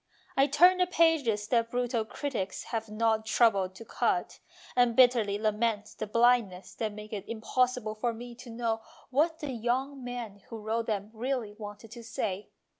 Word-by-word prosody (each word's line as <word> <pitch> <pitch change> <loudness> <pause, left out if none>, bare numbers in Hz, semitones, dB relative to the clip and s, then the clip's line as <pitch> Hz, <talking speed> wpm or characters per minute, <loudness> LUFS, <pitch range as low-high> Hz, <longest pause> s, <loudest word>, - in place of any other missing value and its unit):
I 275 +1 +5
turn 355 +6 +6
the 360 - +3
pages 300 - +2
that 230 -2 +2
brutal 245 -2 0
critics 235 -5 -4
have 225 -1 -4
not 220 0 +1
troubled 200 -5 +3
to 230 - -10
cut, - - -1 0.4
and 245 -2 +4
bitterly 235 -5 +5
lament 215 0 0
the 215 - -2
blind 235 0 +4
ness 180 +1 -12
that 220 -2 -2
makes 210 +1 -9
it 200 -3 -5
impossible 240 0 0
for 235 +3 -1
me 240 +1 -8
to 245 +1 -12
know 225 -1 -2 0.3
what 320 +5 +2
the 295 -3 -3
young 255 +3 -2
men 240 -5 -6
who 230 - -6
wrote 225 +1 -2
them 210 -1 -2
really 235 -2 -2
wanted 210 0 -9
to 235 0 -9
say. 205 -3 -3
230 Hz, 175 wpm, -29 LUFS, 215-250 Hz, 0.4 s, turn